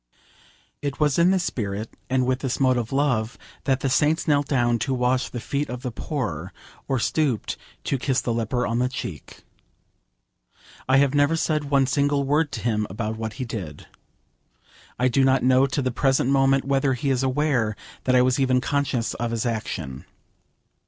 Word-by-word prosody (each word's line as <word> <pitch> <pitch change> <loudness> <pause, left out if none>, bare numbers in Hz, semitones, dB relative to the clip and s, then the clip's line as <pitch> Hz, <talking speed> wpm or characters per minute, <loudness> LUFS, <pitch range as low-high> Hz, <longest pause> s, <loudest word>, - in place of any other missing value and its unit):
It 140 -1 -4
was 150 0 +2
in 170 +2 +5
this 190 -1 +2
spirit, 105 - -4
and 130 -1 +2
with 130 0 0
this 130 -3 -2
mode 130 -2 +3
of 120 -2 -3
love, 125 -5 0 0.3
that 135 -2 +1
the 135 - 0
saints 150 +6 +2
knelt 145 -2 +2
down 120 -4 +1
to 130 +4 -1
wash 125 +1 +1
the 120 - -5
feet 140 +5 -2
of 125 0 -6
the 125 - -3
poor, 105 - -4 0.4
or 135 - +1
stooped 130 -1 0 0.3
to 135 - -1
kiss 130 0 +1
the 120 - -1
leper 115 +2 -1
on 115 +1 -1
the 125 +1 +1
cheek. 95 - -7 1.5
I 135 - +5
have 140 0 +3
never 145 +2 +3
said 155 -2 0
one 140 -1 +3
single 140 +2 +1
word 145 +2 +1
to - - -4
him 105 -3 0
about 110 +3 -3
what 110 -1 -4
he 130 -1 -5
did. 95 -11 -6 1.1
I 125 - +2
do 135 +2 +2
not 130 0 +3
know 130 +1 +4
to 140 0 -1
the 130 - 0
present 135 +1 +1
moment 135 -1 +3
whether 135 -1 +1
he 135 +3 -1
is 130 -1 +1
aware 130 -5 +1 0.3
that 130 - +3
I 125 - +6
was 130 +1 +2
even 130 -1 +3
conscious 135 -3 -1
of 120 0 -3
his 115 0 -2
action. 85 - -4
130 Hz, 185 wpm, -24 LUFS, 120-140 Hz, 1.5 s, I